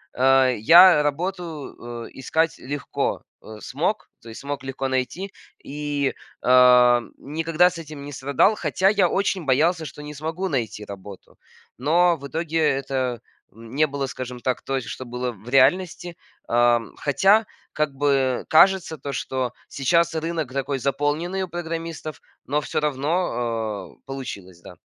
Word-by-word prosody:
а, 135 Hz, 0 st, +5 dB
я 165 Hz, -, +7 dB
работу, 150 Hz, -7 st, -4 dB
э, -, -, -14 dB
искать 160 Hz, +5 st, 0 dB
легко, 140 Hz, +2 st, -3 dB, 0.2 s
э, 110 Hz, -, -11 dB
смог, 165 Hz, -, -2 dB
то 115 Hz, -, -12 dB
есть 110 Hz, -, -9 dB
смог 140 Hz, -1 st, -5 dB
легко 135 Hz, 0 st, -3 dB
найти 130 Hz, +10 st, -3 dB, 0.3 s
и, 145 Hz, -1 st, -2 dB, 0.3 s
а, 125 Hz, -1 st, +6 dB, 0.2 s
никогда 165 Hz, +4 st, +1 dB
с 175 Hz, -, -9 dB
этим 155 Hz, -3 st, -9 dB
не 145 Hz, -, -8 dB
страдал. 140 Hz, +11 st, +2 dB
Хотя 190 Hz, -2 st, 0 dB
я 195 Hz, -3 st, +3 dB
очень 195 Hz, -2 st, 0 dB
боялся, 160 Hz, +5 st, +2 dB
что 150 Hz, -, -9 dB
не 150 Hz, 0 st, -8 dB
смогу 160 Hz, +6 st, -4 dB
найти 115 Hz, -, -3 dB
работу. 100 Hz, -1 st, -11 dB, 0.4 s
Но 170 Hz, +6 st, +3 dB
в 140 Hz, -3 st, -10 dB
итоге 165 Hz, +2 st, -2 dB
это 135 Hz, -4 st, 0 dB, 0.4 s
не 120 Hz, +7 st, 0 dB
было, 140 Hz, -1 st, -3 dB
скажем 125 Hz, -1 st, -7 dB
так, 125 Hz, +1 st, -2 dB
той, 135 Hz, -1 st, -2 dB
что 130 Hz, +3 st, -7 dB
было 125 Hz, +1 st, -3 dB
в 110 Hz, 0 st, -16 dB
реальности. 165 Hz, +6 st, +2 dB, 0.3 s
Ам, 120 Hz, -1 st, +2 dB
хотя 195 Hz, +10 st, +3 dB, 0.3 s
как 150 Hz, -2 st, -1 dB
бы 135 Hz, -2 st, +1 dB
кажется 175 Hz, 0 st, +4 dB
то, 140 Hz, -1 st, -6 dB
что 125 Hz, 0 st, -3 dB
сейчас 170 Hz, +4 st, +1 dB
рынок 160 Hz, -4 st, -3 dB
такой 135 Hz, 0 st, -2 dB
заполненный 145 Hz, +8 st, -1 dB
у -, -, -4 dB
программистов, 165 Hz, -2 st, -5 dB, 0.3 s
но 145 Hz, +2 st, 0 dB
всё -, -, -2 dB
равно, 120 Hz, -, -2 dB
э, -, -, -34 dB
получилось, 100 Hz, -10 st, -7 dB
да. -, -, -12 dB
140 Hz, 145 wpm, -23 LUFS, 125-165 Hz, 0.4 s, я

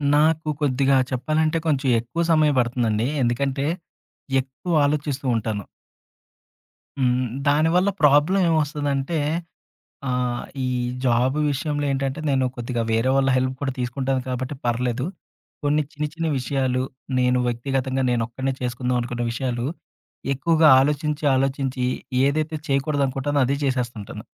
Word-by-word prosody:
నాకు 155 Hz, +1 st, +2 dB
కొద్దిగా 135 Hz, -1 st, +3 dB
చెప్పాలంటే 155 Hz, +5 st, +1 dB
కొంచెం 140 Hz, -3 st, +1 dB
ఎక్కువ 120 Hz, +9 st, -3 dB
సమయం 155 Hz, -2 st, +4 dB
పడుతుందండి. 120 Hz, -2 st, +1 dB, 0.2 s
ఎందుకంటే, 135 Hz, +4 st, 0 dB, 0.7 s
ఎక్కువ 135 Hz, +7 st, -7 dB
ఆలోచిస్తూ 145 Hz, -1 st, -1 dB
ఉంటాను. 105 Hz, -3 st, -2 dB, 1.3 s
హ్మ్. 125 Hz, 0 st, +2 dB, 0.2 s
దానివల్ల 165 Hz, +6 st, +3 dB
ప్రాబ్లమ్ 150 Hz, +6 st, +5 dB
ఏమొస్తదంటే 145 Hz, -1 st, 0 dB, 0.9 s
ఆహ్, 125 Hz, -1 st, -1 dB, 0.2 s
ఈ -, -, 0 dB, 0.4 s
జాబు 130 Hz, +3 st, +2 dB
విషయంలో 145 Hz, +1 st, -1 dB
ఏంటంటే, 135 Hz, +2 st, -2 dB
నేను 130 Hz, -2 st, +2 dB
కొద్దిగా 120 Hz, -1 st, -3 dB
వేరే 115 Hz, +3 st, +2 dB
వాళ్ళ 135 Hz, 0 st, +3 dB
హెల్ప్ 130 Hz, 0 st, +1 dB
కూడా 135 Hz, -2 st, 0 dB
తీసుకుంటాను 130 Hz, +1 st, -1 dB
కాబట్టి, 130 Hz, +2 st, -3 dB
పర్లేదు. 120 Hz, +1 st, 0 dB, 0.6 s
కొన్ని 150 Hz, +1 st, +2 dB
చిన్న, 150 Hz, 0 st, -3 dB
చిన్న 165 Hz, 0 st, -2 dB
విషయాలు, 130 Hz, -1 st, 0 dB, 0.4 s
నేను 125 Hz, 0 st, +3 dB
వ్యక్తిగతంగా, 130 Hz, +2 st, -1 dB
నేనొక్కడినే 120 Hz, +3 st, -1 dB
చేసుకుందాం 125 Hz, 0 st, -1 dB
అనుకున్న 120 Hz, 0 st, -3 dB
విషయాలు, 120 Hz, 0 st, -2 dB, 0.7 s
ఎక్కువగా 160 Hz, +2 st, +4 dB
ఆలోచించి, 150 Hz, +1 st, -1 dB
ఆలోచించి 135 Hz, -1 st, 0 dB, 0.4 s
ఏదైతే 155 Hz, +3 st, 0 dB
చేయకూడదనుకుంటానో 140 Hz, 0 st, 0 dB
అదే 140 Hz, +2 st, 0 dB
జేసేస్తుంటాను. 120 Hz, -6 st, -3 dB
135 Hz, 115 wpm, -23 LUFS, 125-145 Hz, 1.3 s, ప్రాబ్లమ్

